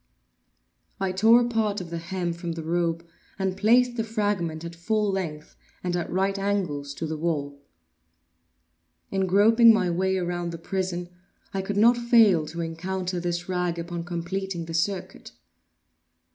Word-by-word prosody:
I 190 -1 0
tore 220 +6 +6
a 240 - +1
part 220 -3 0
of 175 -2 -8
the 170 - -3
hem 175 0 -3
from 170 0 -5
the 165 -1 -6
robe 170 0 -1 0.3
and 190 -1 -1
placed 240 +5 +3
the 225 - +1
fragment 205 -7 -2
at 170 - -6
full 210 +4 0
length, 160 -6 -4 0.3
and 180 -1 -1
at 175 - -3
right 195 +2 0
angles 170 -9 -2
to 165 - -4
the 155 -1 -4
wall. 145 -4 -2 1.5
In 190 -1 0
groping 225 +5 +6
my 185 -5 +2
way 190 +2 +1
around 175 -1 -2
the - - -5
prison, 180 0 -3 0.4
I 195 - -1
could 200 +1 -3
not 235 +3 +6
fail 225 -9 +4
to 170 +2 -5
encounter 180 +2 -3
this 175 +1 -3
rag 180 -2 -1
upon 170 0 -4
completing 175 +1 -4
the 165 - -7
circuit. 185 +3 -3
180 Hz, 160 wpm, -26 LUFS, 170-200 Hz, 1.5 s, tore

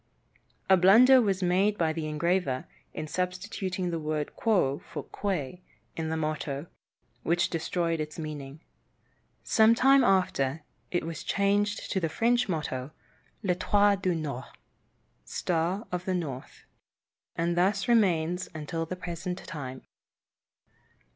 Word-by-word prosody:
A 190 - +6
blunder 240 +9 +7
was 195 -4 0
made 195 +4 +2
by 160 -3 +1
the 160 -1 -3
engraver, 155 -3 0 0.3
in 155 - -5
substituting 180 +2 -3
the 165 - -2
word 150 -1 -3
"Quo" 180 -11 +1
for - - -7
"Quae," 180 -4 -3 0.3
in 160 -1 -3
the 160 - -1
motto, 155 -2 -3 0.6
which 175 +3 +1
destroyed 165 0 -1
its 155 0 -5
meaning. 150 -2 -7 0.8
Some 220 +1 +5
time 270 +2 +5
after, 165 - +1 0.3
it 175 -2 -1
was 165 -2 -5
changed 205 +1 0
to 190 - +1
the 165 -3 -1
French 240 +5 +1
motto, 140 -6 -3 0.5
"L'Etoile 200 +2 +3
du 185 -2 0
Nord" 140 -5 -4 0.8
("Star 180 +5 -1
of 180 0 -3
the 185 - 0
North"), 140 -7 -6 0.7
and 170 +1 0
thus 195 +5 +1
remains 180 -6 +2
until 165 +2 -4
the 185 - -4
present 180 0 -5
time. 130 -4 -7
175 Hz, 130 wpm, -28 LUFS, 155-195 Hz, 0.8 s, blunder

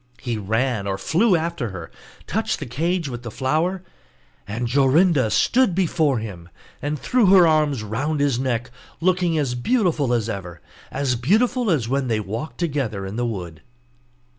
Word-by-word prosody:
He 120 -2 -3
ran 110 +1 -1
or 95 -1 -1
flew 190 - +2
after 160 -7 -2
her, 85 -4 -8 0.3
touched - - -1
the - - -6
cage 165 +7 -1
with 120 -3 -6
the 120 - -6
flower, 160 - -1 0.6
and 115 +4 -3
Jorinda 140 - +3
stood 225 - +2
before 160 -7 +1
him, 95 -6 -7 0.3
and 145 +1 -2
threw 220 - +2
her 185 -2 +7
arms 150 -7 +2
round 140 +9 -2
his 140 -4 +1
neck 125 -2 -2 0.3
looking 175 -1 +1
as 140 -5 0
beautiful 160 - +1
as 115 -3 +1
ever, 90 -5 -6 0.3
as 135 -2 -1
beautiful 220 - +1
as 140 -10 +1
when 135 +1 0
they 110 -2 0
walked 110 +9 -5
together 135 - -2
in 95 +2 -6
the 120 +1 -1
wood. 90 -8 -6
135 Hz, 165 wpm, -22 LUFS, 115-165 Hz, 0.6 s, her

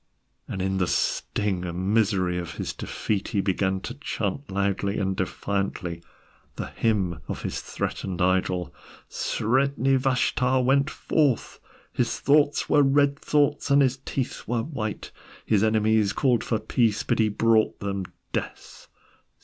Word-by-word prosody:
And 95 - -3
in 95 0 0
the 90 - +1
sting 95 -1 -1
and 90 +3 -2
misery 95 -5 +2
of 85 -4 -6
his - - -4
defeat, 100 -3 -3
he 100 - -1
began 95 0 0
to - - -5
chant 140 -3 -4
loudly 100 +1 0
and 95 -1 0
defiantly 95 -2 -2 0.5
the - - -4
hymn 95 -8 0
of - - -5
his - - -3
threatened 90 -2 -4
idol: 90 -1 +1 0.3
Sredni 135 +3 +1
Vashtar 130 -1 +1
went 140 +3 +3
forth, 145 -6 0 0.3
His - - -1
thoughts 145 0 +3
were 150 - +5
red 140 +1 +3
thoughts 145 0 +1
and 140 0 +6
his 130 0 +1
teeth 130 -1 -4
were 115 -1 0
white. 110 -8 -5 0.3
His 105 -2 +2
enemies 110 -1 +3
called 125 -3 +2
for 115 - 0
peace, 110 -1 +1
but - - 0
he 110 -1 +4
brought 110 +1 +2
them 100 -2 -3 0.3
death. - - -5
110 Hz, 140 wpm, -25 LUFS, 95-130 Hz, 0.5 s, and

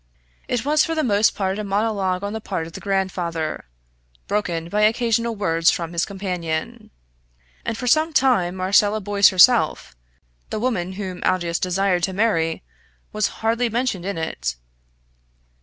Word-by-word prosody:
It 245 0 -2
was 300 +1 +3
for 325 - -2
the 310 - 0
most 210 -2 +2
part 195 0 -2
a - - -3
monologue 200 -2 -1
on 205 +1 -3
the 220 - -4
part 185 -6 -3
of 165 - -11
the - - -7
grandfather, 180 - -2 0.6
broken 175 -5 -2
by 210 +4 -1
occasional 230 +1 +1
words 165 -5 +2
from 170 -1 -2
his 170 - 0
companion; 180 -5 -4 0.7
and 225 - -3
for 250 - -5
some 310 +6 +3
time 245 - +2
Marcella 200 +3 +2
Boyce 200 -1 +4
herself 185 - +4 0.5
the - - -3
woman 195 -7 -1
whom 185 -2 -6
Aldous 175 -2 0
desired 185 0 +1
to 190 - -1
marry 175 -6 0 0.5
was 215 -1 +1 0.2
hardly 230 +2 +1
mentioned 230 -6 -2
in 200 -3 -3
it. 60 - -3
195 Hz, 155 wpm, -22 LUFS, 175-220 Hz, 0.7 s, Boyce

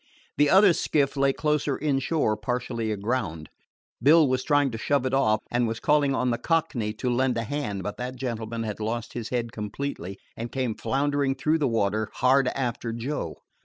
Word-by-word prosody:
The 145 +1 +4
other 190 +1 +7
skiff 140 -3 +1
lay 140 0 +3
closer 150 -1 0
inshore, 140 -4 +1
partially 115 +1 -2
aground. 100 - -2 0.5
Bill 155 +4 +6
was 130 0 0
trying 145 -3 +2
to 110 - -5
shove 140 +2 +1
it 130 - -1
off, 110 -6 +3
and 120 -1 +1
was 115 0 -3
calling 145 -2 +2
on 125 -1 +1
the 115 - -1
Cockney 145 -10 0
to 115 - -4
lend 125 0 +1
a 115 - -1
hand; 105 -7 -3
but 105 - -5
that 125 +1 -4
gentleman 115 -3 -4
had 105 -1 -4
lost 115 +2 -3
his 115 -2 -5
head 120 -2 -2
completely, 105 -3 -5 0.2
and 115 +1 -6
came 130 -4 -1
floundering 140 +2 0
through 155 +4 +1
the 145 - +2
water 110 -2 0
hard 130 +1 +3
after 120 -3 -2
Joe. 120 +6 -4
125 Hz, 185 wpm, -26 LUFS, 115-140 Hz, 0.5 s, other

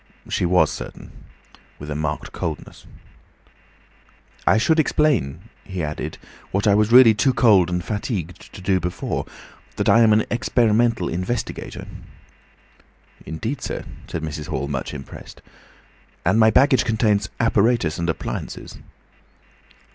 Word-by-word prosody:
She 90 - 0
was 85 -3 +3
certain, - - -8 0.7
with 75 +1 -8
a - - -3
marked 75 0 -3
coldness. 80 -2 -6 1.6
"I - - +5
should 160 +8 +2
explain," 125 - +1 0.2
he 95 -4 -5
added, 75 0 -4 0.3
"what 100 +3 -1
I 105 - +5
was 105 +2 +2
really 125 -2 +8
too 125 +5 +1
cold 100 -9 +5
and 90 0 -2
fatigued 105 - -4
to - - -10
do 95 0 +1
before, 90 +1 -3 0.5
that - - -2
I 115 - +6
am 115 -2 +5
an 105 +1 +3
experimental 115 -4 +2
investigator." 95 +7 -4 1.4
"Indeed, 110 - -4
sir," - - -4 0.2
said 80 - -5
Mrs. 80 0 -5
Hall, 70 -4 -3
much 70 -2 -4
impressed. 70 -2 -10 0.9
"And 95 +6 +3
my 110 0 +6
baggage 130 +3 +4
contains 105 -3 +1
apparatus 115 -7 +2
and 85 0 -1
appliances." 80 - -5
100 Hz, 130 wpm, -22 LUFS, 85-115 Hz, 1.6 s, really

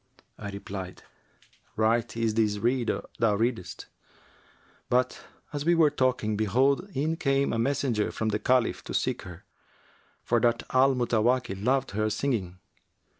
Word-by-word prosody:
I 100 - -5
replied, 100 -2 -7 0.7
'Right 115 +1 +1
is 115 -1 +1
this 105 -2 +1
rede 120 +2 0 0.3
thou 110 -3 +3
redest;' 110 -6 -2 1.0
but, 125 +1 +1 0.3
as 145 -1 -2
we 170 +2 +3
were 160 -3 +4
talking, 130 -6 0
behold, 130 - +1
in 155 +4 0
came 135 -4 +1
a 115 - -1
messenger 130 -3 0
from 110 - -2
the 105 0 -1
Caliph 125 +2 +1
to - - -5
seek - - 0
her, 90 -1 -11 0.8
for 120 - +2
that 120 0 +1
Al 135 +1 +4
Mutawakkil 120 -4 0
loved 135 +2 +1
her 110 +2 0
singing. 105 -9 -2
115 Hz, 140 wpm, -27 LUFS, 105-130 Hz, 1.0 s, were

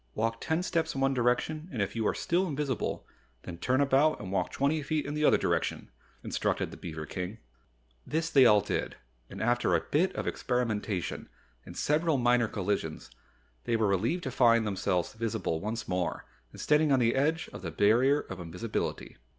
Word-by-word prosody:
"Walk 115 +1 -1
ten 160 +3 0
steps 165 -4 -1
in 135 - -2
one 135 0 +3
direction 130 +7 0
and 125 - -5
if 100 +2 -1
you 110 -2 0
are - - 0
still 180 +3 0
invisible, 145 -4 -2 0.4
then 85 -1 -8
turn 130 +8 +1
about 140 +3 +3
and 95 -2 -7
walk 95 -2 0
twenty 145 +3 0
feet 150 0 -1
in 145 - -4
the 150 0 -1
other - - +5
direction," - - -1 0.3
instructed - - -1
the - - -10
beaver 80 -2 -6
King. 90 +5 -5 0.7
This 160 +2 -1
they 135 -5 +7
all 105 -2 +6
did - - -3 0.3
and - - -9
after 120 -6 +2
a - - +3
bit 160 - +1
of - - -3
experimentation 110 -7 -2 0.4
and - - -9
several 155 0 +2
minor 120 -1 +3
collisions, 100 - -3 0.5
they 115 - +1
were 110 -1 +2
relieved 110 - 0
to - - -3
find 115 -2 +4
themselves 95 -3 -1
visible 110 -7 -2
once 110 +4 -4
more 90 -1 -2 0.3
and - - -13
standing 150 0 +3
on 135 - +5
the 120 -2 +3
edge 155 +5 +1
of - - -8
the 90 - -4
Barrier 120 - +3
of 95 - -9
Invisibility. 90 +6 -4
120 Hz, 185 wpm, -29 LUFS, 100-145 Hz, 0.7 s, they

